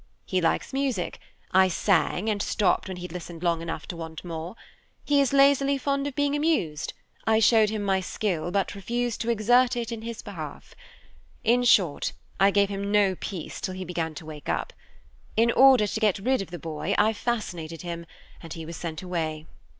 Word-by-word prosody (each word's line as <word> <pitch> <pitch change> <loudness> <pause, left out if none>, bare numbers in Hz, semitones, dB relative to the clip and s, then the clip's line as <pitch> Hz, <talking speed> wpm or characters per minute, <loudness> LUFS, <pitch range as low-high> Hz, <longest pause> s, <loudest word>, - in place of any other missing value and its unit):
He 185 -1 0
likes 165 - 0
music; 265 -9 -1 0.3
I 190 0 +6
sang, 185 +2 +1
and 210 -2 0
stopped 190 -2 +1
when 190 -1 -5
he'd 180 -1 -7
listened 175 -1 -8
long 170 -2 +1
enough 165 -1 -5
to - - -4
want 160 -1 -7
more. 165 +3 -5 0.5
He 285 -1 +4
is 275 - +1
lazily 275 0 +4
fond 280 +1 -1
of 280 - -6
being 285 0 +1
amused; 290 - 0 0.3
I 220 0 +4
showed 220 -1 +5
him 215 -1 -3
my 195 -1 +2
skill, 185 -3 -2
but 195 +1 0
refused 235 +4 -2
to 235 - -2
exert 245 +3 +4
it 235 -1 -3
in 230 -1 -5
his 230 0 -6
behalf. 160 -8 -8 0.7
In 240 +2 +4
short, 185 -10 +3 0.3
I 195 +1 +6
gave 200 0 +3
him 200 0 -3
no 205 -2 +4
peace 180 -2 -6
till 185 - -3
he 185 0 -5
began 165 -2 -3
to 160 - -8
wake 155 -2 -8
up. - - -2 0.6
In 230 +1 +4
order 260 -3 +6
to 210 - -3
get 215 -4 +2
rid 255 +5 +1
of 195 - -7
the 175 - -6
boy, 155 -1 -3
I 220 +2 +4
fascinated 175 -9 -3
him, 170 -1 -5 0.3
and 165 - -8
he 165 -1 -7
was 165 +1 -7
sent 165 0 -5
away. 160 -4 -3
195 Hz, 195 wpm, -26 LUFS, 170-235 Hz, 0.7 s, I